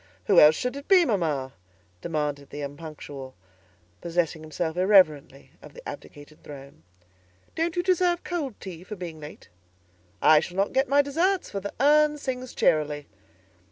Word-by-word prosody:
"Who - - +5
else 150 +1 +7
should 250 +7 -3
it 280 0 -9
be, 370 -3 +6
mamma?" 155 - -1 0.5
demanded 150 -3 -3
the 145 - -7
Unpunctual, 145 -2 -9 0.7
possessing 170 -2 -1
himself 160 +1 -4
irreverently 180 -8 +2
of - - -14
the - - -11
abdicated 145 +1 -11
throne. 140 - -12 0.7
"Don't 330 0 -2
you 350 - 0
deserve 360 -1 +1
cold 300 - -4
tea, 180 -3 -9
for 210 +3 -8
being 170 -4 -8
late?" 150 0 -12 0.7
"I 155 +8 +6
shall 175 +4 -7
not 195 +1 0
get 265 0 +1
my 285 +1 +4
deserts, 350 +7 0
for 200 - -3
the 200 +1 -7
urn 300 +2 +4
sings 255 -3 -5
cheerily." 150 -1 +1
175 Hz, 155 wpm, -25 LUFS, -, 0.7 s, else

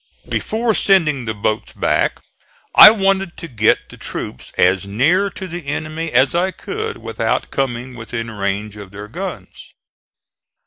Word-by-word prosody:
Before 225 +1 -1
sending 155 - +2
the 110 -1 -3
boats 105 +1 -2
back - - 0 0.5
I - - +12
wanted 195 -3 0
to 170 - -7
get 110 -6 +1
the - - -13
troops 65 - -6
as 95 +1 +3
near 160 - +2
to 190 - -8
the 175 -4 -7
enemy 155 +2 -3
as 130 +2 +3
I 175 +2 +1
could 440 - -5
without - - -2
coming 130 -1 -2
within 115 -1 -6
range 100 0 -3
of 100 -2 -9
their 100 +2 -9
guns. - - -8
135 Hz, 145 wpm, -19 LUFS, -, 0.5 s, I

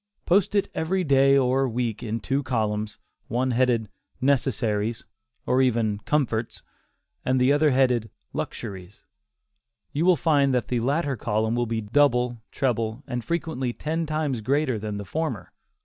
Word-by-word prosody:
Post 195 +3 +2
it 200 - +2
every 185 +4 0
day 135 -2 +5
or 130 0 +2
week 115 -1 -2
in 115 -1 -3
two 135 +6 -1
columns, 105 -5 -2 0.3
one 125 +2 0
headed 120 -2 +2 0.3
"necessaries" 115 -5 0 0.4
or 130 +1 +3
even 115 -5 +1
"comforts," 120 -6 -1 0.6
and 130 0 +1
the 130 +3 +4
other 150 +1 +4
headed 125 -4 +2 0.2
"luxuries," 95 -4 -6
and - - -44 0.9
you - - +3
will 180 - +6
find 140 -5 +2
that 125 - -1
the 125 - +1
latter 140 +3 0
column 110 0 -1
will 120 0 0
be 115 0 -2
double, 125 0 +2
treble, 115 -2 -1
and 125 -3 -4
frequently 155 -7 -2
ten 160 +4 -2
times 150 -6 -1
greater 130 0 +1
than 105 -1 -4
the 100 - -6
former. 160 - -3
125 Hz, 150 wpm, -25 LUFS, 110-140 Hz, 0.9 s, will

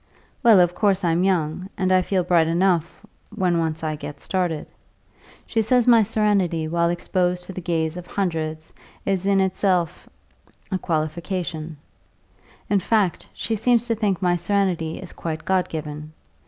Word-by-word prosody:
Well, 225 -5 +7
of 175 -1 +4
course 195 0 +1
I'm 170 +1 +2
young, 180 -1 0
and 185 0 +1
I 185 0 +5
feel 185 0 0
bright 170 -2 +3
enough 170 -1 0 0.2
when 175 -2 0
once 160 -1 -2
I 155 -1 -1
get 145 -1 -8
started. 175 -4 -2 0.8
She 225 - 0
says 240 +2 +3
my 235 -2 +6
serenity 200 -7 +1
while 170 +1 +1
exposed 180 +1 -1
to 190 - -8
the 185 - -6
gaze 165 -2 -1
of 180 - -8
hundreds 160 -4 -3 0.3
is 195 -1 0
in 200 -1 +3
itself 185 -2 0 0.6
a 190 - 0
qualification; 165 0 -3 0.9
in 205 - +2
fact, 200 -2 0
she 230 - -3
seems 235 +2 +2
to - - +3
think 205 -4 -1
my 175 -1 +3
serenity 175 -3 0
is - - -9
quite 155 -1 -5
God 190 -1 +1
given. 150 -1 -6
180 Hz, 155 wpm, -23 LUFS, 165-195 Hz, 0.9 s, Well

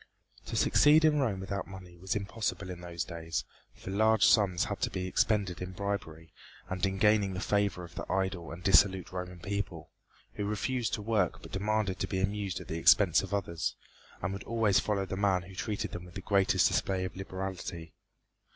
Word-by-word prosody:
To - - -4
succeed 155 +2 +5
in 150 -1 +4
Rome 115 -8 0
without 100 +1 -4
money 95 -2 -11
was 90 +2 -3
impossible 100 -2 -3
in 90 -1 -8
those 85 -2 -4
days, 80 0 -4 0.3
for 95 - -8
large 110 +2 +4
sums 95 -5 +4
had 100 -1 -4
to - - +1
be 95 -1 -3
expended 100 -1 +1
in 90 +1 -5
bribery 90 -5 -4 0.3
and 95 -1 -5
in 95 0 -3
gaining 105 -2 +3
the - - -3
favor 100 -3 0
of 85 - -11
the - - -6
idle 95 -3 -1
and 85 +2 -9
dissolute 95 -2 +4
Roman 90 -1 -5
people, 95 -3 -4 0.4
who 105 - -3
refused 115 +4 -1
to 105 - -7
work 105 -4 0
but - - -10
demanded 105 -1 -1
to - - -1
be 95 - -2
amused 100 -1 -1
at - - -10
the 80 - -3
expense - - +6
of - - -7
others, 90 -5 -2 0.5
and 95 +1 -1
would 100 - -6
always 110 -3 +3
follow 100 -2 -1
the 95 - -4
man 95 -3 +2
who 95 +2 -12
treated 105 +2 -3
them 90 - -7
with 90 - -14
the 95 - -5
greatest 100 0 +3
display 95 -1 0
of 90 - -6
liberality. 95 -3 -6
95 Hz, 195 wpm, -30 LUFS, 90-105 Hz, 0.5 s, expense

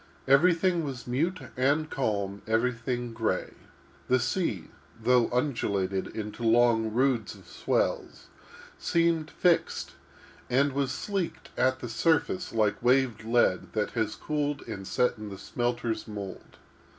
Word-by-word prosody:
Everything 170 +5 +4
was 135 -4 -5
mute 165 +9 0 0.2
and 140 +5 +2
calm; 100 -6 -1
everything 120 +1 -1
gray. 115 0 -1 0.5
The 130 - +3
sea, 120 - -1 0.3
though 120 +1 +3
undulated 100 -8 0
into 105 +1 -6
long 115 -1 +3
roods 125 -2 +1
of - - -16
swells, - - -1 0.5
seemed 165 -2 +1
fixed, 175 -2 +1 0.6
and 135 +3 +2
was 140 -1 0
sleeked 195 +4 -3
at 130 +1 +1
the 120 - -4
surface 165 +8 +1
like 110 -2 +1
waved 125 -2 +2
lead 115 -5 +1
that 105 -2 -1
has 110 -2 -1
cooled 145 -1 -2
and 95 -4 -6
set 125 -2 +1
in 105 -1 -6
the 100 - -8
smelter's 120 +2 -2
mould. 100 -3 -8
120 Hz, 125 wpm, -28 LUFS, 110-140 Hz, 0.6 s, Everything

